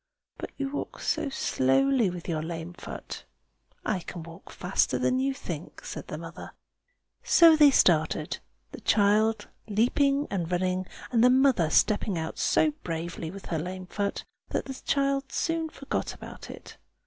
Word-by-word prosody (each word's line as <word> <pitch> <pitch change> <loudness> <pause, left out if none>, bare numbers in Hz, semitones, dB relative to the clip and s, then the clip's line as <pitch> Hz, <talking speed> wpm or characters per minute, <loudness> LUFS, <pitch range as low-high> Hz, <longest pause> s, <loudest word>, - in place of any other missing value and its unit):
"But - - -5
you 275 -1 -2
walk 290 - -5
so 285 - -1
slowly, 255 - +2
with 175 -1 -7
your 160 -3 -1
lame 165 +1 -5
foot." - - -8 0.6
"I 210 -5 0
can 170 0 -8
walk 165 0 -12
faster - - 0
than 255 - +1
you 270 +1 +1
think!" 170 - -7
said - - -6
the - - -5
mother. - - -9 0.7
So 335 -2 +7
they 300 -2 +7
started, 160 - +2 0.3
the - - -9
child 215 +2 +3 0.2
leaping 275 +7 +2
and 175 -3 -2
running, 185 +1 0 0.2
and 235 -2 +3
the 250 - +7
mother 255 - +4
stepping 205 +2 +2
out 160 0 -4
so 310 - +3
bravely 165 0 -4
with 195 +3 -9
her 165 - -2
lame 185 +3 -5
foot 200 +2 -3 0.2
that - - -2
the 270 - -5
child 275 -1 0
soon 330 -1 -1
forgot 275 -2 -4
about - - -10
it. - - -11
205 Hz, 160 wpm, -27 LUFS, 170-275 Hz, 0.7 s, So